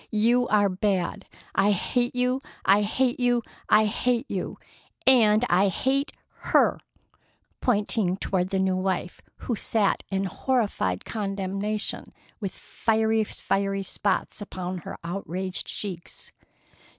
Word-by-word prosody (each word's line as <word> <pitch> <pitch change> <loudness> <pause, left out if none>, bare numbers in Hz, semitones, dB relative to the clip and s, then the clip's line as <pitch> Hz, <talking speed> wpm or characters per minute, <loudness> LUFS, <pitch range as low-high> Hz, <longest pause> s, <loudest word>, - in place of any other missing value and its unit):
You 235 +3 +3
are 205 -1 +4
bad! 195 0 -1 0.3
I 200 - +3
hate 240 +5 0
you! 250 +1 +1 0.2
I 200 +2 +6
hate 245 +5 +1
you! 245 -1 +2 0.3
I 215 +1 +6
hate 235 +3 0
you! 190 -3 -3 0.5
And 230 -3 +6
I 185 +3 +4
hate 270 - 0 0.4
her!"—pointing 205 -5 -1
toward 185 -2 -1
the 195 - 0
new 190 -1 +2
wife, 185 -1 -2 0.2
who 240 - 0
sat 210 -1 +1
in 195 0 0
horrified 200 - 0
condemnation, 200 0 -3 0.3
with 195 -4 -4
two 220 -1 +1
fiery 195 -1 -1
spots 200 +2 -1
upon 185 -2 -5
her - - -8
outraged 185 +1 -4
cheeks. 185 -5 -5
205 Hz, 115 wpm, -26 LUFS, 190-230 Hz, 0.5 s, I